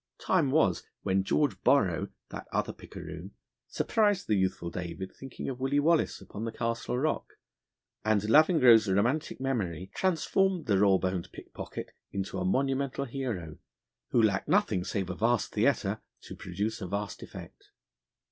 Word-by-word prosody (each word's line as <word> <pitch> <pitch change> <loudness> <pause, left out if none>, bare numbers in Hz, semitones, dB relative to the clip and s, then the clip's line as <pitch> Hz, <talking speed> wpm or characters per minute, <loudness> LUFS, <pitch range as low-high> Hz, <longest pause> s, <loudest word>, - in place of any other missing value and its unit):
Time 165 -7 +2
was 130 - +3 0.2
when 95 -1 +1
George 145 +8 +1
Borrow, - - +3 0.2
that - - -8
other - - -1
picaroon, - - -9 0.3
surprised 205 -4 +1
the 110 - +1
youthful 95 -3 -1
David, 90 +2 -5
thinking 135 -1 -8
of 130 -2 -4
Willie 135 +2 +1
Wallace 160 +2 +2
upon 105 - -7
the 115 - -2
Castle 115 +2 -2
Rock, 155 +5 -1 0.7
and 110 -1 +3
Lavengro's 125 - +6
romantic 115 +11 +1
memory 95 -10 -2
transformed 190 0 +1
the 100 -3 +2
raw 100 -1 +5
boned 90 -2 -2
pickpocket - - -8 0.2
into 95 -1 -3
a 90 - -1
monumental 135 +6 0
hero, 115 - -4 0.5
who - - +2
lacked 105 -4 +2
nothing 95 -4 +2
save 95 -1 -2
a - - -5
vast 115 0 +1
theatre - - +1 0.2
to - - -9
produce 100 +5 -3
a 95 - -4
vast 100 +2 -4
effect. - - -11
110 Hz, 145 wpm, -29 LUFS, 95-140 Hz, 0.7 s, Lavengro's